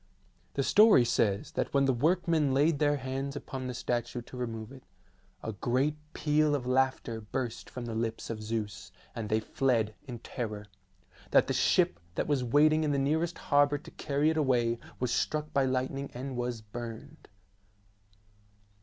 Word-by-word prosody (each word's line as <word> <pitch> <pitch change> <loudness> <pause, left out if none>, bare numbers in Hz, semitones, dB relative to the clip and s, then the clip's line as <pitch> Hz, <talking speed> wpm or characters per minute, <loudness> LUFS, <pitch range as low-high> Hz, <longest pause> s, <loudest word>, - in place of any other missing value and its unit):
The 140 - +1
story 210 - +6
says 100 -3 +1
that - - -2
when 140 0 +4
the 135 - +3
work 165 +8 +1
men 150 -5 +2
laid 145 +2 +3
their 145 -1 +3
hands 135 +1 -4
upon 130 -2 -5
the 125 - -3
statue 120 0 -2
to 125 - -12
remove 115 -2 -5
it, 135 -1 -12 0.6
a 110 - -3
great 130 +8 0 0.2
peal 150 0 +2
of 130 -4 -3
laughter 130 -3 0
burst 120 +2 -4
from 125 -1 -6
the 115 - -4
lips 115 0 -3
of 110 -1 -5
Zeus, 110 -2 -4 0.2
and 110 -2 -5
they 110 0 +2
fled 115 -2 0
in 125 -2 -5
terror; 110 -3 -5 0.6
that - - +5
the - - -1
ship 85 - +3 0.2
that - - 0
was 140 -4 +1
waiting 155 +5 +4
in 150 - +1
the 140 - +1
nearest 160 +5 0
harbour 145 0 +3
to 145 - -13
carry 145 +1 +1
it 160 - -2
away 120 -5 +2 0.2
was 125 -1 0
struck 155 0 -1
by 135 -1 +3
lightning 130 +2 -1
and 130 +1 -5
was 120 -2 -3
burned. 120 +7 -8
130 Hz, 170 wpm, -30 LUFS, 115-145 Hz, 0.6 s, story